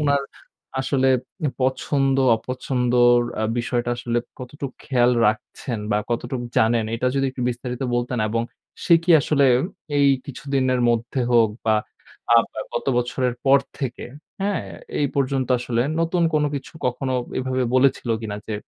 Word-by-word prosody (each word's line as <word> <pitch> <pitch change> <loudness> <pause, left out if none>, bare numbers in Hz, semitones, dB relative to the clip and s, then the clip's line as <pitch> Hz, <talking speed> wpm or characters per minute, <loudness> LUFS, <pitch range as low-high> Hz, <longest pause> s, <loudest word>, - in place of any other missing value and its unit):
উনার 140 -1 +2 0.6
আসলে 135 0 +1 0.5
পছন্দ-অপছন্দর 130 -2 +2 0.4
বিষয়টা 120 0 -1
আসলে 120 -1 -1 0.2
কতটুকু 135 +1 -7
খেয়াল 125 -2 +3 0.2
রাখছেন 110 +2 -2
বা, 105 - +2
কতটুকু 120 +1 -2
জানেন? 115 0 +3
এটা 115 +2 -1
যদি 135 0 +1
একটু 130 -1 -6
বিস্তারিত 125 +1 -4
বলতেন 120 +1 -1
এবং 115 +1 0 0.4
সে 170 - +6
কি 175 - -1
আসলে 140 0 +2 0.5
এই 140 - +5 0.2
কিছুদিনের 135 -2 -1
মধ্যে 120 +3 0
হোক 115 -2 +5 0.2
বা 110 - +4 0.6
আ - - +8 0.2
ব্য - - -23 0.2
গত 120 - -3
বছরের 125 0 0
পর 135 0 +6 0.2
থেকে, 130 -4 -4 0.4
হ্যাঁ? 205 - 0 0.4
এই 145 - +3
পর্যন্ত 135 -2 0
আসলে 120 -1 0 0.2
নতুন 170 +1 +1
কোন 150 -1 +3
কিছু 140 - -6
কখনো 130 +1 -2 0.3
এভাবে 130 0 -1
বলেছিল 130 -1 +3
কিনা 105 -2 -4
যে, 110 - -3
130 Hz, 140 wpm, -22 LUFS, 120-135 Hz, 0.6 s, আ